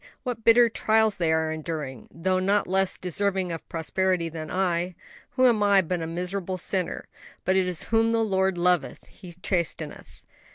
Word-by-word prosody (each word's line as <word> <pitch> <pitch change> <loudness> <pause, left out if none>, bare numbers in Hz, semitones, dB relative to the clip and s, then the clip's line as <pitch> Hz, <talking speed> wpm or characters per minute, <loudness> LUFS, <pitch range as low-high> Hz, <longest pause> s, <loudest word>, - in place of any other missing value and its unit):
what 245 -3 -4
bitter 235 +1 +6
trials 220 -1 +2
they 170 -3 +1
are 160 0 +1
enduring; 155 -6 -5
though 185 +3 -1
not 200 +2 +2
less 190 0 0
deserving 185 0 0
of 165 - -7
prosperity 175 +1 -1
than 155 -1 -7
I, 180 -1 -1 0.4
who 255 -1 +4
am 235 -4 +4
but 195 -4 +2
a 160 - -3
miserable 180 +2 -4
sinner. 185 0 -2 0.4
But 185 - +2
it 190 -1 +2
is 180 -3 -2
whom 225 0 +2
the 230 0 +2
Lord 190 -3 +1
loveth 180 0 0
He 180 - -13
chasteneth." 170 -4 -3
185 Hz, 165 wpm, -26 LUFS, 170-200 Hz, 0.4 s, bitter